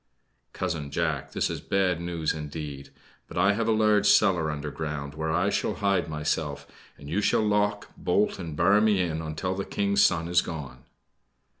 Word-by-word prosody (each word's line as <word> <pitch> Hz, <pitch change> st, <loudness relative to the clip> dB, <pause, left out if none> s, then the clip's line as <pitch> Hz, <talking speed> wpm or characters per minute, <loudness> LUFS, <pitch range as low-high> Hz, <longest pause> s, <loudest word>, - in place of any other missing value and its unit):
"Cousin 75 Hz, -3 st, -3 dB
Jack, 75 Hz, -2 st, -2 dB
this -, -, +1 dB
is -, -, -5 dB
bad 95 Hz, -3 st, 0 dB
news 85 Hz, -2 st, -1 dB
indeed! 75 Hz, -2 st, -6 dB, 0.4 s
But -, -, -9 dB
I 100 Hz, +3 st, +4 dB
have 115 Hz, +2 st, -1 dB
a -, -, +3 dB
large 105 Hz, -2 st, +3 dB
cellar 85 Hz, -5 st, +4 dB
underground, 75 Hz, -1 st, -4 dB
where 80 Hz, +1 st, -2 dB
I 90 Hz, +5 st, +1 dB
shall -, -, -1 dB
hide 100 Hz, -5 st, 0 dB
myself, 75 Hz, -1 st, -2 dB, 0.3 s
and 70 Hz, -, -12 dB
you 90 Hz, +8 st, 0 dB
shall 105 Hz, +1 st, +2 dB
lock, 105 Hz, 0 st, 0 dB
bolt 100 Hz, +4 st, 0 dB
and 80 Hz, -5 st, -6 dB
bar 100 Hz, +2 st, +4 dB
me 105 Hz, -3 st, +3 dB
in 80 Hz, -3 st, -1 dB
until 80 Hz, +4 st, -3 dB
the 100 Hz, +1 st, -3 dB
King's 100 Hz, 0 st, +1 dB
son 85 Hz, -2 st, +2 dB
is 85 Hz, 0 st, +3 dB
gone." 75 Hz, -5 st, -7 dB
85 Hz, 175 wpm, -27 LUFS, 75-100 Hz, 0.4 s, I